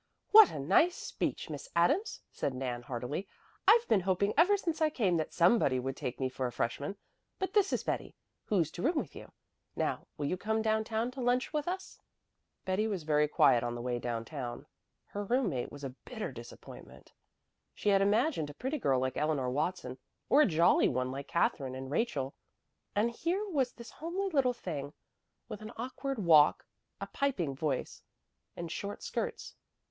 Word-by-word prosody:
"What 435 0 +10
a - - -6
nice 195 - +3
speech, - - -3
Miss - - -7
Adams!" 420 - +2
said 135 - -2
Nan 125 -2 -3
heartily. 125 +9 -4 0.4
"I've 470 0 +6
been 220 - +4
hoping 190 +2 +1
ever 360 +7 +5
since 335 -5 -3
I 310 - +4
came 205 - +1
that 155 - -2
somebody 170 - +3
would 135 +1 -3
take 125 - -5
me 130 - +1
for 130 0 -3
a - - -5
freshman. 140 +12 -3 0.4
But 380 0 -3
this 405 -2 +3
is - - 0
Betty, - - -3 0.3
who's 175 -7 +1
to 175 - -7
room 320 - +2
with - - -3
you. - - -10 0.4
Now - - -2
will 145 - -2
you 180 +6 -1
come 220 +3 -1
down 220 0 +2
town 225 +2 -1
to 260 0 -7
lunch 250 +4 +1
with 300 0 -1
us?" 375 +2 -5 0.7
Betty 190 +4 +1
was 195 -6 -3
very 150 -1 +3
quiet 120 -5 +4
on 120 0 -2
the 120 - -5
way 120 -1 -1
down 115 -1 -3
town. 130 -2 -6 0.4
Her 205 - -5
roommate 200 - 0
was 145 0 -10
a 135 - -4
bitter 220 - -5
disappointment. 115 - -12 0.6
She 210 - 0
had 195 -1 +4
imagined 205 - +2
a 145 - -10
pretty 270 - -3
girl 135 - +2
like 130 0 -2
Eleanor 150 -5 0
Watson, 140 -3 -2 0.3
or 290 - +6
a - - +6
jolly 170 -2 +4
one 125 +1 -1
like 140 +1 -6
Katherine 135 -6 0
and 130 +1 -6
Rachel; 145 - -1 0.6
and 220 +3 +2
here 360 - -1
was 270 -8 +1
this 235 -1 -11
homely 365 +5 -3
little 265 -5 +3
thing 150 - -5 0.5
with 210 - -7
an 215 +1 -7
awkward 265 +3 -4
walk, 160 -7 +5 0.3
a - - -3
piping 190 - -1
voice, 140 -2 -2 0.6
and 170 -1 -5
short 200 +3 -5
skirts. 470 -2 -4
185 Hz, 185 wpm, -32 LUFS, -, 0.7 s, What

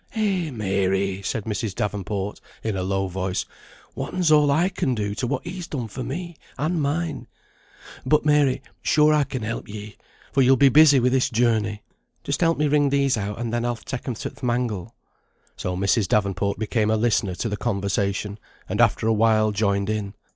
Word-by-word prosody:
"Eh, 195 -7 0
Mary!" 95 -4 0
said 105 +2 -3
Mrs. 105 -2 -3
Davenport, 105 0 -3 0.2
in 110 -3 -1
a 95 - -2
low 95 +1 0
voice. 95 0 -2 0.5
"Whatten's 180 -4 -1
all 150 -1 +5
I 160 +6 +3
can 130 -9 -1
do, 105 -2 -2
to 120 +4 -2
what 130 +1 -2
he's 180 -1 -6
done 125 -6 -4
for 130 - -5
me 170 +5 -5 0.2
and 160 +2 0
mine? 155 +3 -2 0.8
But, 150 +3 +2
Mary, 145 -3 +3 0.2
sure 150 0 +4
I 150 -2 +3
can 130 -3 -5
help 110 +2 -4
ye, 105 0 -8 0.3
for 135 - +3
you'll 130 +1 +6
be 140 +2 +6
busy 145 -1 +7
wi' 125 +1 +3
this 130 +1 +2
journey." 110 -3 +1 0.4
"Just - - -2
help 165 -1 +3
me 150 - +2
wring 145 -1 +3
these 140 -1 +2
out, 105 -1 -3
and 115 0 -3
then 120 0 0
I'll 120 0 0
take 120 +4 -7
'em 125 - -2
to - - -5
th' - - -20
mangle." 120 -4 -2 0.6
So 90 0 -3
Mrs. 100 +2 +2
Davenport 100 0 0
became 110 0 0
a 110 - +2
listener 105 -5 +1
to 115 - -2
the 105 - -2
conversation; 100 -1 -2 0.3
and - - 0
after - - +3
a 110 - +3
while 110 -1 +3
joined 100 -1 0
in. 105 -2 -3
115 Hz, 190 wpm, -23 LUFS, 100-140 Hz, 0.8 s, busy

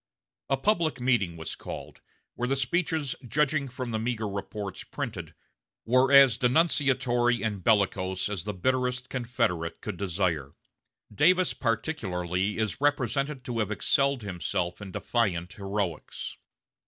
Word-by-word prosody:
A 135 - +2
public 160 - +1
meeting 120 -9 +1
was 80 - -5
called, - - -8 0.3
where 125 - -2
the 135 - +1
speeches, 155 +1 0
judging 140 +2 +1
from 130 -1 -5
the 110 - -1
meager 110 -1 -1
reports 100 0 -5
printed, - - -6 0.5
were 130 +3 +4
as 135 -4 +7
denunciatory 125 -4 +2
and 105 -4 -2
bellicose 95 -4 +2
as 100 -5 -3
the 105 +1 -3
bitterest 125 +4 0
Confederate 115 -10 -1
could 105 -4 -5
desire. 85 -7 -1 0.6
Davis 180 - +4
particularly 100 - -1
is 110 +2 -2
represented 140 -1 0
to 120 -2 -3
have 105 -3 0
excelled 135 +4 +1
himself 90 -1 -2
in 100 -2 -7
defiant 95 -5 -1
heroics. 100 -5 -4
115 Hz, 130 wpm, -28 LUFS, 95-135 Hz, 0.6 s, as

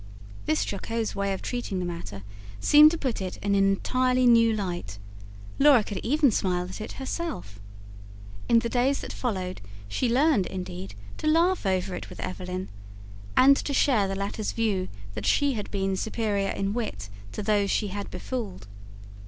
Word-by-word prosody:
This 155 - +1
jocose 225 +2 -3
way 200 0 -1
of 190 - -4
treating 245 -6 -3
the 180 - -2
matter 105 - -6 0.4
seemed 300 - +8
to 335 - -3
put 260 -9 -2
it 185 -1 -4
in 200 0 -1
an 195 0 +4
entirely 255 +6 +2
new 230 -1 +6
light; 175 - -3 0.6
Laura 275 -5 +6
could 200 -2 -5
even 285 - +3
smile 180 -3 0
at 185 +4 -7
it - - -6
herself. 265 - -5 0.9
In 235 - +6
the 230 0 +2
days 255 +3 +1
that - - -6
followed, 185 -7 -3 0.3
she 240 - -1
learned, 265 - +3
indeed, 100 - -6 0.2
to - - -2
laugh 335 - +3
over 185 0 0
it - - -6
with - - -11
Evelyn, 185 0 -4 0.7
and 275 +2 +8
to 280 - -2
share 230 -10 +3
the 195 - -3
latter's 200 +2 -3
view 205 -5 0 0.3
that 105 -1 -4
she 285 -1 +3
had 210 -4 -5
been 195 -1 -1
superior 205 -1 -1
in 195 +1 -2
wit 105 - -4 0.2
to 210 - -4
those 205 -1 +2
she 210 0 0
had 200 +1 -5
befooled. 200 - -5
205 Hz, 170 wpm, -26 LUFS, 185-250 Hz, 0.9 s, seemed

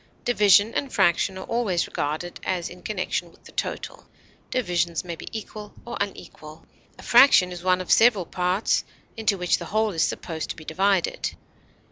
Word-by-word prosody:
Division 210 -2 +4
and 275 -2 -2
fraction 190 0 +2
are 190 - -7
always 215 -7 0
regarded 155 +4 -4
as 180 -2 -2
in 180 0 -12
connection 185 -4 -3
with - - -24
the - - -14
total; - - -5 0.4
divisions 175 -8 -1
may 170 -2 -6
be - - -11
equal 210 -1 -8
or 240 - -6
unequal; 160 -5 -7 0.3
a - - -13
fraction 240 -7 +6
is 175 -1 -7
one 185 0 +2
of 185 - -5
several 220 -4 +5
equal - - -22
parts 180 +3 +1 0.3
into 220 -3 0
which 180 -1 +1
the - - -6
whole 215 +1 0
is 165 -4 -2
supposed 160 -1 -2
to - - -4
be 155 - -12
divided. 190 +2 0
185 Hz, 175 wpm, -24 LUFS, 175-215 Hz, 0.4 s, fraction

